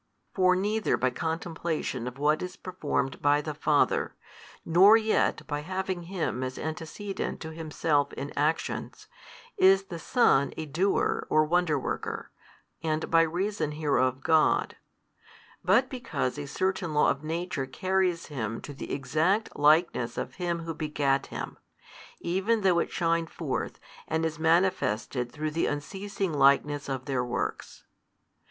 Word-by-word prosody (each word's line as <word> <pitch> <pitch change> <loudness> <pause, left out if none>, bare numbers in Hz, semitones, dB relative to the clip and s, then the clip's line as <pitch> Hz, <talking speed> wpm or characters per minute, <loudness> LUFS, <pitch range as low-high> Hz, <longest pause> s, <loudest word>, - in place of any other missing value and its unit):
For 185 -1 +4
neither 210 +3 +1
by 130 0 +1
contemplation 160 -4 -3
of 125 +1 -6
what 150 +2 +2
is 180 0 -5
performed 155 -7 -3
by 145 0 +4
the 150 +1 -4
Father, 150 0 +1 0.5
nor 190 +7 +7
yet 220 -1 +1
by 145 - -3
having 185 +2 -3
Him 170 -9 -2
as 130 0 -4
antecedent 160 +6 -4
to 160 - -6
Himself 155 -2 0
in 140 +1 -6
actions, 150 +3 -1 0.5
is 195 +1 +6
the 175 -3 -7
Son 160 - +3
a 160 - -3
Doer 175 +7 0
or 155 0 +4
Wonder 170 -2 +2
worker, 135 - -4 0.5
and 155 0 -2
by 165 0 +6
reason 165 -1 -1
hereof 135 -4 +1
God: 160 -1 +3 0.9
but 230 +8 +4
because 240 - -3
a 145 - -5
certain 180 +1 -1
law 150 - +5
of 140 - -5
Nature 165 -3 -3
carries 185 +4 0
Him 115 -6 -4
to 145 - -8
the 135 - -7
Exact 155 - 0
Likeness 150 -5 +3
of - - -4
Him 170 -1 -1
who 165 0 -4
begat 145 -3 0
Him, - - -6 0.6
even 195 +6 0
though 185 -3 +4
it - - -1
shine 165 -1 0
forth 155 -5 -4 0.3
and 160 +1 0
is 160 -1 -3
manifested 160 - +1
through 155 +3 -3
the 165 - 0
unceasing 190 +5 -3
likeness 140 +1 +3
of 130 -1 -3
Their 130 -3 0
Works. 120 0 -4
160 Hz, 145 wpm, -28 LUFS, 145-185 Hz, 0.9 s, nor